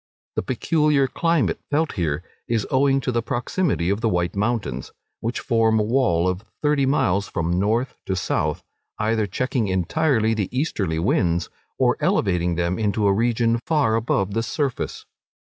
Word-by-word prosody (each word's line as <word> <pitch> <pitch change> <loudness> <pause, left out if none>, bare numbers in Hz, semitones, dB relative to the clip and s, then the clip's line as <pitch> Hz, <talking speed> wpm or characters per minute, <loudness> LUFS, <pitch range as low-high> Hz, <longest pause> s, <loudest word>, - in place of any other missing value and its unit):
The - - +1
peculiar 150 +1 +2
climate 150 - +1
felt 150 +1 +1
here, 80 -4 -2 0.2
is 115 -3 0
owing 135 0 +3
to 125 - -1
the 120 -1 0
proximity 120 - -1
of 100 +2 -1
the 115 - +2
White 90 -1 0
Mountains, 100 - -2 0.3
which 115 +2 -2
form 115 -1 +2
a - - +2
wall 105 -7 +2
of 90 +2 -2 0.2
thirty 145 -2 +2
miles 100 -8 +1
from 85 +2 -1
north 115 +6 +1
to 95 - 0
south, 75 -4 -1 0.3
either 110 0 0
checking 120 +2 -1
entirely 110 - +1
the 105 -4 -1
easterly 105 - -1
winds, 85 0 +1 0.3
or - - +2
elevating 90 -2 +1
them 85 +3 -1
into 105 -1 +1
a 100 - +4
region 115 +1 +1
far 145 -9 +2
above 100 -3 0
the 115 - +1
surface. 135 +2 -3
110 Hz, 160 wpm, -23 LUFS, 95-130 Hz, 0.3 s, a